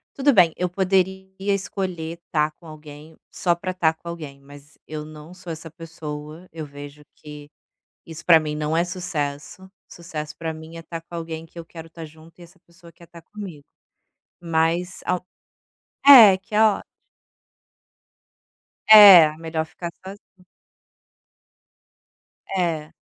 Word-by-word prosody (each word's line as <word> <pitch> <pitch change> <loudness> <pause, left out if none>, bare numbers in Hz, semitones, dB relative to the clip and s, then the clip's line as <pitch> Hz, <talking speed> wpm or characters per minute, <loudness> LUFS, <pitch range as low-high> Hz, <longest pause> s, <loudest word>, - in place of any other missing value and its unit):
tudo 280 +1 +3
bem, 180 - +4
eu 180 0 -2
poderia 190 0 0
escolher 185 -4 -3
estar 150 -1 -1
com 170 - -16
alguém 155 0 -13
só 175 -2 0
para 185 +2 -5
estar 165 -3 0
com 170 - -16
alguém, 155 -5 -8
mas 145 +1 -17
eu 150 -1 -6
não 155 +2 -12
sou 180 -2 -10
essa 160 -1 -9
pessoa, 160 0 -9
eu 155 -2 -7
vejo 145 +1 -12
que 150 -1 -12 0.6
isso 165 0 -10
pra 170 -2 +7
mim 155 -1 -4
não 150 +1 -2
é 170 - +2
sucesso, 180 0 -5 0.2
sucesso 155 -3 -8
para 165 -1 -4
mim 160 +1 -11
é - - -7
estar 165 0 -8
com 165 +1 -15
alguém 165 -1 -6
que 165 - -15
eu 165 - -8
quero 165 0 -12
estar 165 0 -11
junto 160 +2 -16
e - - -14
essa 175 +2 -17
pessoa 170 0 -18
quer 170 - -18
estar 170 0 -15
comigo. 185 -8 -10 0.8
Mas 170 +1 -1
ao 180 0 -2 0.8
é, 225 -9 +10
que 210 +3 -9
é 215 - +4
ótimo. 215 -2 +2 2.1
É, 190 -8 +9
melhor 160 -1 -4
ficar 170 +2 -8
sozinha. 190 -1 -14 2.1
É. 165 -5 -2
165 Hz, 150 wpm, -22 LUFS, 155-180 Hz, 2.1 s, é